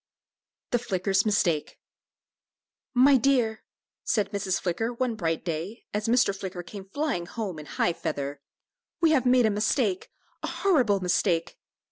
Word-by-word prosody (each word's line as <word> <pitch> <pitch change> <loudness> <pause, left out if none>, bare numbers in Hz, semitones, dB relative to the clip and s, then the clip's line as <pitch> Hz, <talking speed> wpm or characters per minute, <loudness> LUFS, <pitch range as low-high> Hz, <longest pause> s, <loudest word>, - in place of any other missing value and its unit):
THE 245 - +2
FLICKER'S 195 -2 0
MISTAKE. 175 -7 +1 1.2
"My 265 +2 +6
dear," 240 -4 +2 0.4
said 210 -3 0
Mrs. 195 -2 -1
Flicker, 195 +6 -1
one 245 0 -1
bright 165 -6 -2
day, 170 +7 -4
as 210 +1 -1
Mr. 235 -4 +3
Flicker 185 -2 -6
came 195 +2 -9
flying 275 - -2
home 195 -8 -5
in 150 - -10
high 175 - 0
feather, 140 -3 -4 0.6
"we 330 -1 +4
have 260 -5 +3
made 250 -1 +5
a 220 - +3
mistake 210 -1 0 0.3
a - - -3
horrible 250 - +2
mistake." 175 -1 0
205 Hz, 140 wpm, -27 LUFS, 175-240 Hz, 1.2 s, My